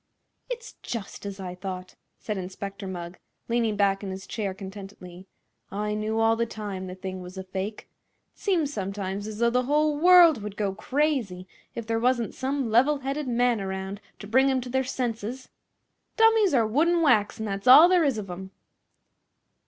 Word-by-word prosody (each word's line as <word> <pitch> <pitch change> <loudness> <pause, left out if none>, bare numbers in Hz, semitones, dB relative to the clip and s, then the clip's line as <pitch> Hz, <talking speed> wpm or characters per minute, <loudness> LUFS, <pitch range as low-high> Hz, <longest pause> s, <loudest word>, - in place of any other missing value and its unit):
"It's 480 -1 -6
just 215 -3 -6
as 200 0 -7
I 180 -2 -5
thought," 185 0 -7 0.2
said 210 - -4
Inspector 195 +1 -6
Mugg, 175 -1 -7 0.3
leaning 230 -2 +1
back 200 0 +1
in 195 - -4
his 190 0 -6
chair 205 -4 -3
contentedly. 190 -1 -10 0.4
"I 210 +2 -2
knew 215 +1 -1
all 225 0 +4
the 235 +1 -1
time 200 -4 -6
the 185 - -7
thing 185 0 -6
was 180 +1 -10
a 190 - -4
fake. 190 +3 -5 0.5
It - - -30
seems 330 -8 0
sometimes 195 0 -4
as 215 -1 -6
though 235 +1 +2
the 250 +1 +1
whole 300 +2 +2
world 345 -6 +7
would 210 0 -7
go 200 -2 -1
crazy 230 -6 -1 0.3
if 230 - -5
there 225 0 0
wasn't 240 -1 +1
some 265 -3 -2
level 265 +6 +4
headed 275 +2 -3
man 240 -2 +2
around 190 +1 -5 0.2
to - - -10
bring 260 +6 +3
'em 265 -1 +2
to 250 - -7
their 265 +1 +1
senses. 245 -1 -4 0.7
Dummies 445 - +5
are 230 -3 +4
wood 280 +10 +2
an' 340 -1 +2
wax, 220 -9 +3
an' 220 - -3
that's 200 +2 -4
all 295 +7 +10
there 360 -2 +4
is 275 -6 +1
of 205 -2 -5
'em." 190 +2 -7
215 Hz, 185 wpm, -26 LUFS, 195-260 Hz, 0.7 s, all